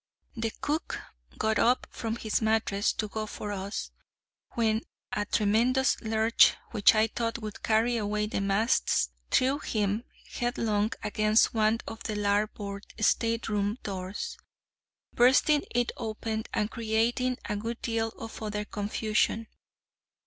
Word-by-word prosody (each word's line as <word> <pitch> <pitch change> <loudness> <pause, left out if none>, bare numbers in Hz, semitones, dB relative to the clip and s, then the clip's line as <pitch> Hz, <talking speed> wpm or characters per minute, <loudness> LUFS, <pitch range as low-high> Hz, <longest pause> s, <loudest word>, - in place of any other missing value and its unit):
The 225 -1 -2
cook 305 +3 -2 0.4
got 220 -1 +1
up 245 +2 +3
from 225 -1 -3
his 220 -2 -1
mattress 220 -2 +2
to 215 - -2
go 215 +1 -4
for 210 0 -5
us, 200 +1 -4 0.6
when 220 -1 +2 0.3
a 205 0 -1
tremendous 235 +6 +2
lurch, 220 +1 +4 0.2
which 215 -1 +5
I 215 0 +5
thought 230 +1 -2
would 215 -2 -7
carry 230 +2 +2
away 210 -1 0
the 210 -1 -2
masts, 195 - +2 0.2
threw 270 +3 +3
him 210 -3 -1 0.3
headlong 220 -4 0
against 215 +1 +3
one 220 0 +2
of 225 - -7
the 215 - -3
larboard 205 -1 -1
stateroom 215 -1 +1
doors, 195 - -5 0.7
bursting 270 +4 +4
it 240 0 0
open, 220 -1 -3
and 210 +1 -1
creating 235 +3 0
a 210 - -1
good 225 +3 -4
deal 225 -1 0
of 225 - -8
other 210 -1 -3
confusion. 215 +2 0
220 Hz, 130 wpm, -29 LUFS, 210-230 Hz, 0.7 s, which